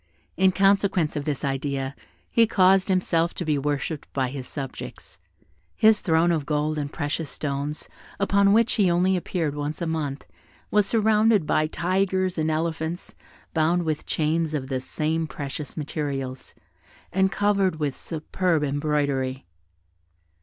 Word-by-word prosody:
In 190 +1 +4
consequence 195 -4 +2
of 145 -1 -3
this 145 -2 -2
idea 135 0 -2 0.4
he 230 -1 +4
caused 190 -2 +4
himself 175 -3 +1
to 175 - -4
be 150 -2 +1
worshipped 145 +1 -3
by 130 -2 0
his 130 -1 -6
subjects. 135 -3 -8 0.6
His 220 -1 +5
throne 165 -1 +3
of 155 -4 -1
gold 150 0 0
and 145 -1 -4
precious 145 0 -3
stones, 145 +1 -4 0.3
upon 200 0 +3
which 230 +2 +4
he 200 -5 +3
only 180 +2 +3
appeared 170 -4 -2
once 145 +1 -4
a 170 - -2
month, 150 -4 -3 0.5
was 210 -1 +3
surrounded 215 -3 +3
by 155 +1 +2
tigers 185 +1 0
and 155 0 +1
elephants, 160 +1 -2 0.4
bound 165 +2 +2
with 155 -2 -3
chains 155 0 0
of 135 -2 -4
the 130 -1 -1
same 160 +4 -2
precious 145 0 -6
materials, 140 -4 -4 0.6
and 190 0 +3
covered 195 -2 +2
with 145 -3 -1
superb 165 0 -1
embroidery. 140 -2 -1
160 Hz, 140 wpm, -25 LUFS, 145-185 Hz, 0.6 s, His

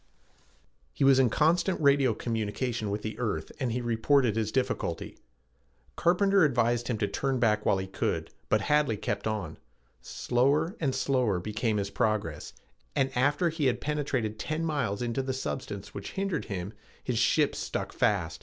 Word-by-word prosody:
He - - -2
was 135 -1 +6
in 130 -2 +4
constant 170 - +2
radio 140 -5 +4
communication 115 0 -2
with 105 +1 -3
the 110 - -5
earth 105 -10 -2
and 130 -4 -1
he 125 +2 -1
reported 120 0 +2
his 110 -1 -1
difficulty. 130 -10 -2 0.8
Carpenter 195 +2 +3
advised 120 -4 +2
him 120 - -1
to 105 - 0
turn 135 +3 -1
back 105 -3 +2
while 100 - +4
he 95 - -3
could, 95 - -2 0.2
but 105 - +3
Hadley 145 -2 +2
kept 105 - -3
on. 100 -8 -3 0.4
Slower 140 - +1
and 140 -5 0
slower 125 -9 +1
became 110 +3 -1
his 100 0 -2
progress, 105 -10 -1 0.4
and 135 -2 0
after 145 +7 +2
he 155 -3 0
had 125 - +1
penetrated 135 -8 -2
ten 155 +7 -2
miles 125 -9 -1
into 120 +2 -1
the 130 0 -2
substance 110 -6 -5
which 100 - -7
hindered 195 -5 -2
him, 95 0 -5 0.3
his 120 -3 -1
ship - - +3
stuck - - -4
fast. 90 -6 0
120 Hz, 165 wpm, -28 LUFS, 105-140 Hz, 0.8 s, was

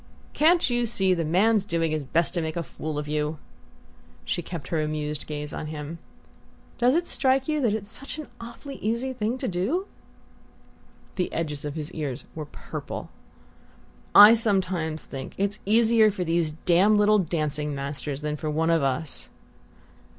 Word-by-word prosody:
"Can't 335 +3 +4
you 240 -1 0
see 195 -4 +2
the 170 -2 0
man's 195 +6 +3
doing 165 -4 0
his 155 -2 -2
best 165 +6 +1
to 175 - -1
make 160 +1 -3
a 170 - -1
fool 155 -1 -6
of 150 0 -3
you?" 150 +1 -1 0.9
She - - -1
kept 165 -4 -7
her 160 -2 0
amused 150 -1 -3
gaze 150 -1 -5
on 155 - -5
him. 155 +1 -6 0.8
"Does 250 +3 +4
it 345 +1 +1
strike 265 -3 +2
you 305 -1 0
that 225 -5 +2
it's 210 -1 -5
such 275 +5 -5
an 310 - -7
awfully 235 +4 -9
easy 235 +5 -2
thing 230 +1 -2
to 260 - -3
do?" 220 - -1 1.3
The 180 - -1
edges 150 -3 -3
of 145 0 -4
his 155 +1 -5
ears 145 -7 -4
were 155 -1 -5
purple. 145 - -7 1.0
"I 210 +2 +11
sometimes 185 - 0
think 135 0 -7
it's 200 +1 -1
easier 225 0 +5
for 195 -3 -3
these 165 -2 0
damned 180 +6 +3
little 210 0 +5
dancing 150 -4 -1
masters 140 +1 -4
than 150 0 -2
for 155 +1 -3
one 160 +2 +1
of 165 -2 +3
us." 135 +2 -1
170 Hz, 170 wpm, -26 LUFS, 150-220 Hz, 1.3 s, I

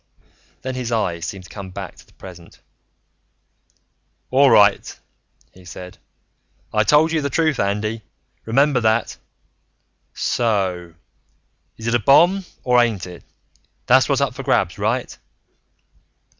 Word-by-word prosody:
Then 130 0 -4
his 125 -2 -4
eyes 90 -7 -1
seemed 95 -1 -7
to - - -15
come 100 -2 -8
back 90 - -8
to - - -18
the - - -26
present. 90 -2 -13 1.7
"All 135 +2 +5
right," 105 -3 +3 0.5
he 95 - -18
said. 90 +1 -11 0.7
"I 110 - +3
told 150 +7 +3
you 160 -1 0
the 140 - -2
truth, 155 0 0
Andy. 105 +3 -2 0.4
Remember 135 +3 +2
that. 110 +1 0 1.0
So 95 -7 -1 0.8
is 110 - -9
it 115 - 0
a 120 - +3
bomb 175 - +4 0.2
or 125 -1 +4
ain't 110 -6 -1
it? 90 -2 -11 0.6
That's - - +4
what's - - +1
up - - 0
for - - -7
grabs, - - 0
right?" - - -2
110 Hz, 130 wpm, -20 LUFS, 95-130 Hz, 1.7 s, All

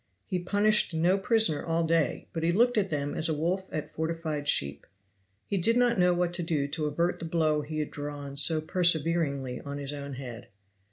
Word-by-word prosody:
He 185 - -2
punished 205 0 +2
no 175 +5 +2
prisoner 220 -8 +3
all 165 0 0
day, 165 -1 +1
but 165 - -3
he 165 +1 +2
looked 240 +7 +3
at 200 -3 +1
them 145 -2 -2
as 165 - 0
a 160 - 0
wolf 180 +5 -2
at 155 - -4
fortified 160 -2 -3
sheep. 70 - 0 0.6
He 200 - -2
did 230 +7 +3
not 245 -4 +3
know 180 0 +4
what 175 0 0
to 175 - -1
do 155 -4 -1
to 150 +1 -2
avert 170 +4 -1
the 165 - -6
blow 160 -2 +1
he 155 +1 -6
had 150 -1 -2
drawn 145 -1 -6
so 155 +3 +2
perseveringly 160 -6 0
on 140 0 -6
his 140 0 -5
own 140 -1 -6
head. 125 -3 -8
160 Hz, 205 wpm, -28 LUFS, 145-180 Hz, 0.6 s, know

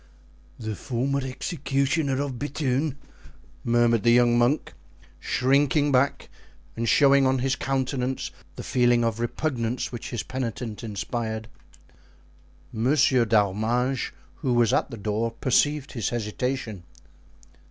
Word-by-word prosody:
"The 110 -2 -4
former 135 +6 -1
executioner 140 0 -1
of 130 -4 -5
Bethune!" 145 0 -1 0.7
murmured 120 -1 +3
the 120 - +3
young 120 0 +5
monk, 120 +5 +1 0.5
shrinking 140 - +2
back 135 +1 +1 0.5
and 115 0 -1
showing 140 -2 +5
on 130 0 +2
his 130 +1 0
countenance 130 -1 -2 0.2
the - - -7
feeling 120 -1 +3
of 115 -1 -1
repugnance 120 -1 -2
which 120 -2 -6
his 120 -4 -3
penitent 120 -4 -5
inspired. 110 +1 -4 1.3
Monsieur 130 +1 +3
d'Arminges, 115 +5 +1 0.3
who 130 -4 -1
was 120 0 +3
at - - +1
the 115 - -7
door, 110 +2 -2
perceived 145 +3 +1
his 115 -7 -2
hesitation. 120 -1 -3
125 Hz, 115 wpm, -25 LUFS, 115-135 Hz, 1.3 s, young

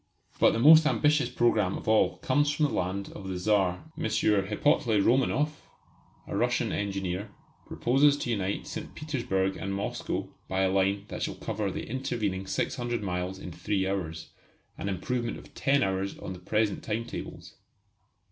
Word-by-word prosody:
But - - +5
the - - 0
most 155 +4 +8
ambitious 150 0 +2
programme 105 -5 +2
of - - -10
all 110 0 +3
comes 145 +3 +2
from 150 +1 +2
the 145 - -1
land 95 +2 -2
of 95 - -8
the 95 -1 -3
Czar. 95 - +1
M. 165 - -5
Hippolyte 105 +1 +2
Romanoff, 135 +6 +1 0.6
a - - -5
Russian - - +1
engineer, 100 0 -2 0.4
proposes 140 +4 +3
to 120 - -3
unite 100 -3 -1
St. - - -7
Petersburg 95 -11 -1
and 100 0 -3
Moscow 100 - -3
by 95 0 0
a 95 -1 +2
line 100 +1 +1
that - - -6
shall - - -2
cover 105 -2 -3
the - - -5
intervening 105 -6 -2
600 120 +3 -2
miles 90 0 -2
in 90 - -8
three 95 +3 -1
hours 85 -4 -4 0.4
an 100 - -4
improvement 120 +5 -2
of - - -14
ten 140 0 +2
hours 95 0 -1
on 95 - -6
the 90 - -10
present 105 +3 0
time 115 +1 -2
tables. - - -8
105 Hz, 165 wpm, -28 LUFS, 95-125 Hz, 0.6 s, most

